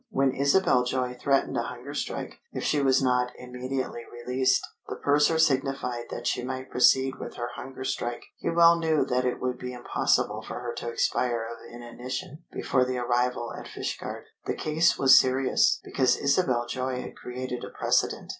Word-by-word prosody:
When 135 -10 +2
Isabel 140 -1 +3
Joy 125 0 -1
threatened 140 -1 +1
a - - +2
hunger 125 +4 -7
strike - - -4
if - - -4
she 150 - +2
was 135 -1 +3
not 125 -1 +2
immediately 125 0 -4
released, 125 +2 +1 0.2
the - - -3
purser 145 +3 +3
signified 135 -5 +1
that 120 - -6
she 125 - 0
might 130 +1 -5
proceed 130 +1 +4
with - - -7
her 120 0 -4
hunger 130 0 -7
strike; 120 -2 -3 0.2
he - - -2
well 170 0 +6
knew 160 -2 +2
that 125 0 0
it 125 - -1
would 125 -1 -2
be 125 0 -5
impossible 120 -1 0
for - - -6
her 120 -1 -4
to 120 - -3
expire 120 0 0
of 115 +1 -9
inanition 125 +6 -7
before 130 - +1
the 130 0 -2
arrival 120 0 0
at - - -8
Fishguard. - - -5 0.2
The - - 0
case 160 +2 +2
was 135 -1 +8
serious, 130 0 +2
because 130 - +2
Isabel 140 -5 +2
Joy 130 +1 -3
had - - -9
created 125 0 -5
a - - -6
precedent. - - 0
130 Hz, 175 wpm, -27 LUFS, 125-135 Hz, 0.2 s, was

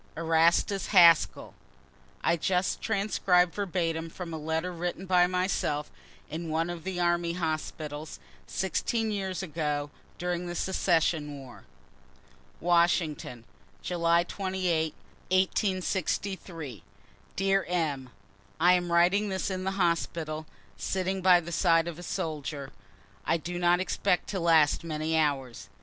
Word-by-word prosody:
ERASTUS 165 +3 +2
HASKELL. 170 -4 +5 0.7
[I - - +3
just 180 +2 0
transcribe 190 -4 +2
verbatim 165 -4 -2
from 170 0 -7
a - - -3
letter 160 +3 -2
written 175 +2 -4
by 180 -1 +4
myself 180 -5 -1 0.4
in 165 +1 -5
one 165 +2 0
of 170 -2 -7
the 185 -1 -4
army 175 -1 +1
hospitals, 155 -2 -4 0.3
16 220 +4 -1
years 190 -2 -3
ago, 150 -4 -2 0.3
during 180 0 -2
the 175 - -5
secession 165 -5 0
war.] 130 -3 -12 0.9
Washington, 170 -7 +1 0.4
July 170 -1 +2
28, 180 -4 -1 0.3
1863. 185 - -1 0.5
Dear 195 0 +2
M., 150 -7 -1 0.5
I 175 +2 +6
am 175 -1 0
writing 185 +5 +3
this 190 0 -2
in 185 0 -3
the 190 0 -2
hospital, 165 -3 -1 0.3
sitting 190 0 -2
by 180 -1 +6
the 170 0 -8
side 165 -1 +3
of 170 -1 -6
a - - -7
soldier, 150 -4 -4 0.5
I 165 - +1
do 175 +2 -5
not 175 0 +3
expect 180 -1 0
to 195 - -2
last 165 -3 +4
many 160 0 -2
hours. 140 -6 -1
170 Hz, 125 wpm, -28 LUFS, 160-185 Hz, 0.9 s, I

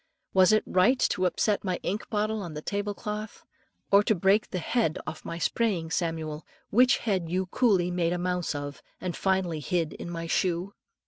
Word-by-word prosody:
Was 185 +1 +6
it 215 - +4
right 185 +9 +3
to 185 -6 +2
upset 205 +3 0
my 185 -3 -1
ink 205 +4 -3
bottle 215 0 0
on 170 -5 -6
the 150 - -5
table 205 0 -2
cloth, 210 +1 -6 0.5
or 200 0 +7
to 215 - +3
break 195 +4 +3
the 185 - -3
head 180 -1 0
off 155 0 -6
my 170 - -5
praying 185 -9 0
Samuel, 160 -3 -2 0.3
which 250 +4 +5
head 190 -7 -1
you 185 +2 0
coolly 185 -4 +2
made 175 -1 +1
a 175 - 0
mouse 180 -2 -1
of, 145 -2 -5 0.2
and 180 -2 -3
finally 190 -4 0
hid 165 0 -1
in - - -7
my 165 -1 -4
shoe? 180 +3 0
185 Hz, 190 wpm, -28 LUFS, 170-205 Hz, 0.5 s, or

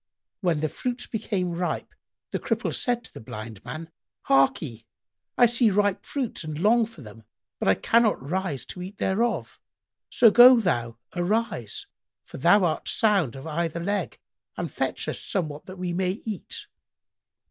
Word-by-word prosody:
When 170 -6 +1
the 155 - +1
fruits 245 - -3
became 200 -5 -2
ripe, 175 +1 -3 0.4
the - - -1
Cripple - - -1
said 245 -2 0
to - - -13
the - - -9
Blind 110 -1 -8
man, 160 +1 -7 0.3
"Harkye, 135 -3 +2 0.5
I 245 - +7
see 240 -1 +3
ripe 205 -1 +1
fruits 260 -9 -2
and 155 -1 -5
long 225 +4 +4
for 195 - -13
them, 110 0 -12 0.4
but - - -1
I 95 - +5
cannot 230 - +3
rise 155 - -3
to 180 - -8
eat 190 +3 -8
thereof; 230 +5 -1 0.5
so 235 -4 +6
go 245 +2 +9
thou 120 - -1 0.2
arise, 175 - -1 0.4
for - - -10
thou 175 +7 +5
art 165 -3 0
sound 195 - +2
of 135 +2 -9
either 165 +1 -2
leg, 200 +4 -2 0.4
and - - -3
fetch - - -2
us - - -3
somewhat 155 -7 -3
that 185 0 -9
we 180 -1 -3
may 185 +1 0
eat." 215 -5 -5
180 Hz, 160 wpm, -26 LUFS, 150-220 Hz, 0.5 s, go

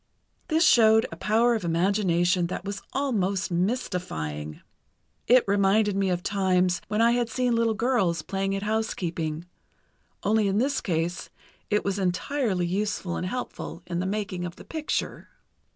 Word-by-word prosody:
This 320 0 +3
showed 220 -1 +6
a - - -6
power 225 +7 +2
of 220 -4 -2
imagination 175 0 +2
that 185 - -5
was 200 0 -4
almost 200 -10 -1
mystifying. 170 - -3 0.7
It 250 +1 +6
reminded 200 +1 +3
me 195 -1 +1
of 180 -1 -1
times 185 -3 +1
when 210 +1 0
I 235 - +5
had 240 -1 0
seen 250 +1 0
little 230 -1 +1
girls 205 -9 +1
playing 195 0 -2
at 195 - -3
housekeeping, 175 -7 -2 0.8
only 215 0 +2
in 195 +1 +1
this 270 +5 +1
case 170 0 -2 0.4
it 210 - +1
was 200 0 -1
entirely 190 +1 0
useful 190 -1 -2
and 180 - -3
helpful 200 -5 -5
in 175 -1 -3
the 185 - -1
making 200 -3 -3
of 175 -1 -5
the - - -13
picture. 315 -2 -3
195 Hz, 150 wpm, -26 LUFS, 175-220 Hz, 0.8 s, showed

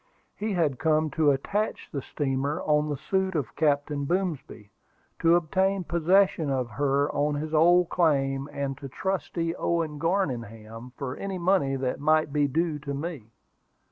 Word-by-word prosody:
He 215 0 -2
had 155 -8 0
come 155 -1 +2
to 155 0 +3
attach 200 +10 -1
the 140 - -3
steamer 140 +1 -2
on 150 0 +2
the 145 - -2
suit 190 +5 -1
of 125 -9 -2
Captain 145 -1 0
Boomsby, 155 - -3 0.5
to 165 +1 +5
obtain 190 +3 +1
possession 170 -1 +2
of 130 -3 -1
her 140 +3 +1
on 145 +1 0
his 155 +2 -4
old 175 +2 +5
claim, 135 -4 +1
and 140 -1 -3
to 135 - -7
trustee 170 0 -2
Owen 165 -4 -1
Garningham 120 - -3
for 130 -2 -4
any 195 -1 -4
money 175 -6 +2
that 130 -1 -2
might 155 0 +2
be 145 -1 +2
due 160 +2 -1
to 140 -1 -5
me. 145 -6 -6
150 Hz, 155 wpm, -27 LUFS, 135-170 Hz, 0.5 s, to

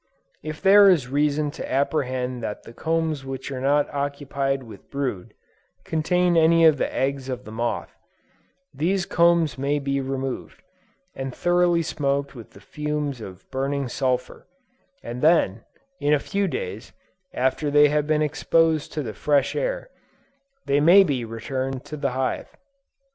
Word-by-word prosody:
If 155 +3 -7
there 200 +1 +8
is 150 -9 +2
reason 145 +1 +1
to - - -7
apprehend 130 -3 -1
that 105 -2 -5
the 115 - -12
combs 160 -1 -1
which 135 0 -6
are 130 -1 -4
not 145 +2 +2
occupied 140 -1 -2
with 115 - -13
brood, 130 -10 -4 0.5
contain 175 +2 +1
any 165 0 +5
of 155 -3 +5
the - - -1
eggs 135 0 -2
of 125 0 -5
the 110 - -9
moth, 115 +2 -3 0.8
these 175 +6 0
combs 170 -6 +2
may 140 +2 0
be 140 -1 -1
removed, 135 0 -5 0.5
and 135 -1 -5
thoroughly 175 -1 +2
smoked 140 -3 -1
with 120 -4 -11
the - - -14
fumes 150 -4 -4
of 95 -2 -10
burning 135 +1 -1
sulphur; 125 0 -2 0.6
and 120 +1 -6
then, 150 - +3 0.3
in 145 +1 +3
a - - 0
few 200 +5 -1
days, 460 - -5 0.4
after 130 +4 0
they 145 0 +6
have 150 0 0
been 155 0 +2
exposed 160 +1 +1
to 150 - -2
the 110 -4 -5
fresh 145 +4 +1
air, - - -2 0.7
they 140 +1 +2
may 175 +6 +7
be 140 -9 -1
returned 130 +3 -4
to 150 - -7
the 140 -3 -2
hive. 130 0 -3
140 Hz, 155 wpm, -24 LUFS, 130-160 Hz, 0.8 s, there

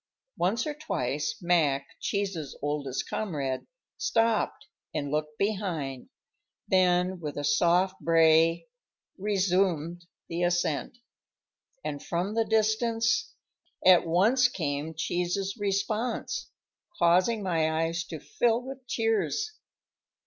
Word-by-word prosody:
Once 210 +8 +1
or 305 - -2
twice 150 - -2
Mac, 155 -6 +2
Cheese's 195 -8 -3
oldest 145 -3 -2
comrade, 140 -11 -3 0.3
stopped 225 -1 +1 0.3
and 145 -1 -2
looked 150 0 -2
behind, 175 -11 -2 0.6
then 180 0 +3
with 150 -3 -5
a 145 - -2
soft 175 +6 +2
bray 165 0 +4 0.5
resumed 185 -4 0 0.2
the 170 +1 -3
ascent; 175 +2 0 0.9
and 145 -2 -3
from 180 +4 -2
the 225 0 +1
distance 225 +3 +1 0.5
at 185 -1 +7
once 220 +10 +4
came 155 - -3
Cheese's 180 +4 -1
response, 215 - -1 0.5
causing 185 +6 +3
my 165 -4 +1
eyes 165 +2 -1
to - - -7
fill 240 - +1
with 265 0 -9
tears. 225 - 0
180 Hz, 105 wpm, -28 LUFS, 160-215 Hz, 0.9 s, at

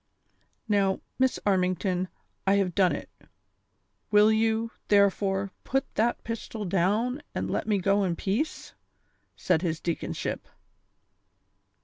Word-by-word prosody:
"Now, 200 -2 +2 0.2
Miss 260 0 +3
Armington, 185 -1 +1 0.4
I 195 - +5
have 195 -3 +1
done 185 -1 +4
it; - - -7 1.0
will 210 +1 +6
you, 225 +1 +1 0.2
therefore, 195 -1 +2
put 270 +1 0
that 235 +2 0
pistol 225 -2 -5
down, 210 - +1
and - - -2
let - - -2
me 210 -2 +2
go 195 +2 +2
in 175 -3 0
peace 215 - -2
V - - -23 0.4
" - - -45
said 160 - +3
his 165 -3 -1
deaconship. 170 -2 -3
200 Hz, 125 wpm, -27 LUFS, 185-220 Hz, 1.0 s, will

